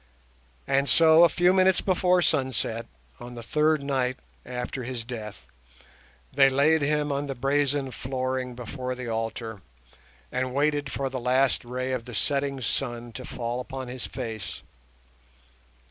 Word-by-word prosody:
And 140 Hz, -, +2 dB
so, 160 Hz, +4 st, +7 dB
a 170 Hz, -, +7 dB
few 180 Hz, +1 st, +3 dB
minutes 190 Hz, 0 st, +4 dB
before 180 Hz, -1 st, +3 dB
sunset, 115 Hz, -5 st, 0 dB, 0.3 s
on 120 Hz, 0 st, -9 dB
the 120 Hz, -, -7 dB
third 150 Hz, +4 st, +2 dB
night 130 Hz, -2 st, 0 dB, 0.3 s
after 125 Hz, +1 st, -4 dB
his 120 Hz, -1 st, -4 dB
death, 110 Hz, -4 st, -7 dB, 0.9 s
they 135 Hz, 0 st, +6 dB
laid 145 Hz, +4 st, +3 dB
him 150 Hz, 0 st, +1 dB
on 140 Hz, +1 st, -1 dB
the 135 Hz, -, -3 dB
brazen 140 Hz, +1 st, +1 dB
flooring 130 Hz, -1 st, -3 dB
before 125 Hz, +1 st, -4 dB
the 125 Hz, -1 st, -6 dB
altar, 115 Hz, -2 st, -3 dB, 0.7 s
and 130 Hz, 0 st, -2 dB
waited 145 Hz, -1 st, +1 dB
for 135 Hz, -, -2 dB
the 130 Hz, -1 st, -4 dB
last 130 Hz, +2 st, +2 dB
ray 130 Hz, +2 st, -3 dB
of 125 Hz, -3 st, -2 dB
the 125 Hz, -3 st, -8 dB
setting 140 Hz, +1 st, 0 dB
sun 120 Hz, 0 st, -2 dB
to 130 Hz, -, -8 dB
fall 120 Hz, 0 st, -4 dB
upon 130 Hz, 0 st, -6 dB
his 125 Hz, 0 st, -6 dB
face. 115 Hz, -5 st, -6 dB
130 Hz, 145 wpm, -27 LUFS, 125-145 Hz, 0.9 s, so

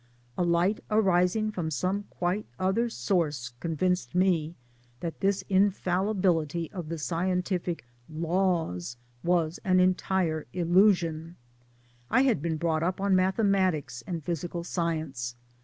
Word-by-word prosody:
A -, -, -2 dB
light 175 Hz, +4 st, +1 dB
arising! 210 Hz, 0 st, +2 dB
from 175 Hz, -6 st, -3 dB
some 185 Hz, +6 st, -1 dB
quite 180 Hz, +4 st, -2 dB
other 195 Hz, +6 st, +1 dB
source 150 Hz, -, -1 dB
convinced 180 Hz, +4 st, -1 dB
me 175 Hz, -3 st, +2 dB, 0.4 s
that 165 Hz, +2 st, -5 dB
this 195 Hz, -1 st, +1 dB
infallibility 185 Hz, -4 st, +1 dB
of 175 Hz, -6 st, -6 dB
the 165 Hz, -, -3 dB
scientific 180 Hz, -, -1 dB, 0.2 s
" 120 Hz, -, -32 dB, 0.2 s
Laws 165 Hz, -, 0 dB
" 120 Hz, 0 st, -34 dB
was 165 Hz, -2 st, 0 dB
an 185 Hz, -2 st, +3 dB
entire 180 Hz, -3 st, +1 dB
illusion. 175 Hz, -2 st, +2 dB, 0.7 s
I 255 Hz, -, +4 dB
had 250 Hz, -, +2 dB
been 160 Hz, 0 st, -1 dB
brought 160 Hz, -1 st, 0 dB
up 180 Hz, +3 st, -1 dB
on 195 Hz, -1 st, +2 dB
mathematics 185 Hz, -, +1 dB
and 170 Hz, -3 st, -4 dB
physical 170 Hz, +1 st, -3 dB
science. 155 Hz, -9 st, -2 dB
175 Hz, 125 wpm, -28 LUFS, 160-190 Hz, 0.7 s, I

